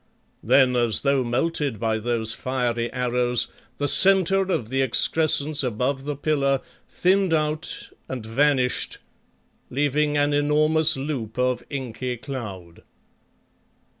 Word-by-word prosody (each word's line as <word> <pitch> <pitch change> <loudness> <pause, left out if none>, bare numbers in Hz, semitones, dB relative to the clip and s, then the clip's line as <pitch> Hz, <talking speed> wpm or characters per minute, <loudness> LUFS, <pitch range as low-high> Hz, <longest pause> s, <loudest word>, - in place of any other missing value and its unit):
Then 130 -2 +3
as 120 -4 +1
though 140 -2 +1
melted 130 0 -2
by 110 0 -1
those 115 -1 -2
fiery 120 -2 -2
arrows, 125 -1 0 0.3
the 145 - -1
centre 195 +2 +6
of 115 -10 -2
the 135 +1 0
excrescence 150 +2 +2
above 130 +3 -2
the 145 0 -3
pillar 140 -2 0 0.3
thinned 185 -2 +1
out 155 0 -3 0.2
and 125 -4 -6
vanished, 130 +2 0 0.7
leaving 145 +2 0
an 145 0 +1
enormous 155 +2 +2
loop 135 -6 -5
of 125 0 0
inky 125 -2 -5
cloud. 105 - -8
135 Hz, 115 wpm, -23 LUFS, 120-150 Hz, 0.7 s, centre